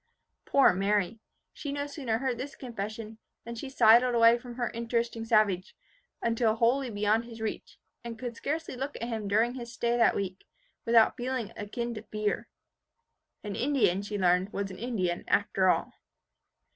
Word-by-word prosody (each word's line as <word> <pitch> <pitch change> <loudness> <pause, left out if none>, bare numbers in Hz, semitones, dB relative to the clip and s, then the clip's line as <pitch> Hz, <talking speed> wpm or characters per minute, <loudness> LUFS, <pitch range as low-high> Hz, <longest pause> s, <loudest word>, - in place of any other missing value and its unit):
Poor 275 -8 +5
Mary! 200 +2 0 0.3
She 285 - -5
no 285 0 -2
sooner 275 -6 -2
heard 255 -1 -2
this 275 +3 -6
confession, 220 -2 -6 0.3
than 235 - -6
she 235 +4 -6
sidled 240 -1 +5
away 230 0 +7
from 240 0 -10
her 240 -2 -2
interesting 235 0 -2
savage, 215 -5 +2 0.5
until 230 -1 +2
wholly 245 +3 +2
beyond 210 +2 +1
his 230 -1 -10
reach, 220 -1 -5 0.3
and 235 -1 -6
could 240 0 -5
scarcely 310 +3 -3
look 270 +3 -4
at - - -6
him 220 -3 -3
during 220 +4 +2
his 240 -2 -7
stay 235 -1 0
that 235 - +4
week, 190 -1 -4 0.4
without 230 -1 +5
feelings 250 -3 -3
akin 235 +3 -4
to 215 - -6
fear. 215 +1 -2 1.0
An 205 -2 -4
Indian, 225 -9 +2
she 205 +1 -4
learned, 180 +1 +2
was 200 -1 -3
an 185 - -10
Indian 190 -8 -2
after 195 -2 +2
all. - - +1
230 Hz, 165 wpm, -29 LUFS, 210-240 Hz, 1.0 s, away